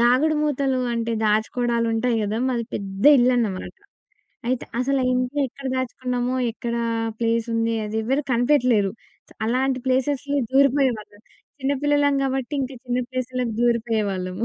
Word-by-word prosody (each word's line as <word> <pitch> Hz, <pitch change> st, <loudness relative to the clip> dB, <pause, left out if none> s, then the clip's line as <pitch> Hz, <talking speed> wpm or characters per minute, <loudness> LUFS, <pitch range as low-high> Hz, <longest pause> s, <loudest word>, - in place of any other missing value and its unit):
దాగుడు 255 Hz, +6 st, +4 dB
మూతలు 275 Hz, -3 st, 0 dB, 0.2 s
అంటే 230 Hz, 0 st, -1 dB
దాచుకోవడాలుంటాయి 230 Hz, +2 st, +1 dB
గదా! 210 Hz, +2 st, -1 dB
మాది 235 Hz, -2 st, -1 dB
పెద్ద 195 Hz, +1 st, -5 dB
ఇళ్లన్నమాట. 240 Hz, -6 st, +1 dB, 0.7 s
అయితే, 255 Hz, -1 st, -1 dB
అసల 270 Hz, +2 st, +1 dB
ఆ -, -, +1 dB
ఇంట్లో 255 Hz, +3 st, -1 dB
ఎక్కడ 275 Hz, +3 st, -9 dB
దాచుకున్నామో, 250 Hz, 0 st, -2 dB, 0.2 s
ఎక్కడా 235 Hz, 0 st, -3 dB, 0.4 s
ప్లేసుంది 230 Hz, 0 st, 0 dB
అదెవ్వరు 220 Hz, +7 st, -1 dB
కనిపెట్టలేరు. 240 Hz, -5 st, +3 dB, 0.4 s
స్ -, -, -17 dB
అలాంటి 255 Hz, +3 st, +1 dB
ప్లేసెస్‌లో 280 Hz, +2 st, 0 dB
దూరిపోయేవాళ్ళం. 260 Hz, -7 st, +2 dB, 0.4 s
చిన్న 270 Hz, +1 st, 0 dB
పిల్లలం 290 Hz, -1 st, +3 dB
గాబట్టి, 270 Hz, +1 st, -2 dB
ఇంక 265 Hz, 0 st, -2 dB
చిన్న 245 Hz, 0 st, -1 dB
ప్లేస్‌లకి 255 Hz, -2 st, -3 dB
దూరిపోయేవాళ్ళము. 220 Hz, -5 st, 0 dB
245 Hz, 120 wpm, -23 LUFS, 230-265 Hz, 0.7 s, దాగుడు